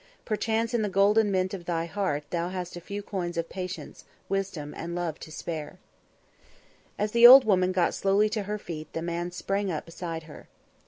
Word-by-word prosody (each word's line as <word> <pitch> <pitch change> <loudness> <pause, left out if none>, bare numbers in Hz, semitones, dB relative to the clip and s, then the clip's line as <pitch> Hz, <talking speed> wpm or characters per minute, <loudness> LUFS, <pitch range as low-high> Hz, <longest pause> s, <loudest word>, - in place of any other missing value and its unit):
Perchance 225 +2 -1
in 235 - +2
the 210 - 0
golden 205 +3 +4
mint 185 -1 0
of 180 -3 -6
thy 165 -1 -1
heart 170 -5 -2
hast 175 +1 -3
thou - - -6
a - - -20
few 200 +2 -5
coins 175 -4 -4
of 170 0 -2
patience, 185 -1 -7 0.3
wisdom 190 -7 -3
and 170 +1 -5
love 170 -3 -3
to 155 - -10
spare." 160 +1 -6 1.2
As 210 +1 -1
the 235 +1 +9
old 260 +2 +10
woman 185 -3 +3
got 185 -2 +1
slowly 200 +2 +2
to 215 -1 -2
her 210 - -1
feet, 155 -6 -8
the 165 - -3
man 170 +1 -2
sprang 195 +2 -2
up 155 - -4
beside 165 -1 -6
her. 155 -1 -13
185 Hz, 195 wpm, -27 LUFS, 170-205 Hz, 1.2 s, old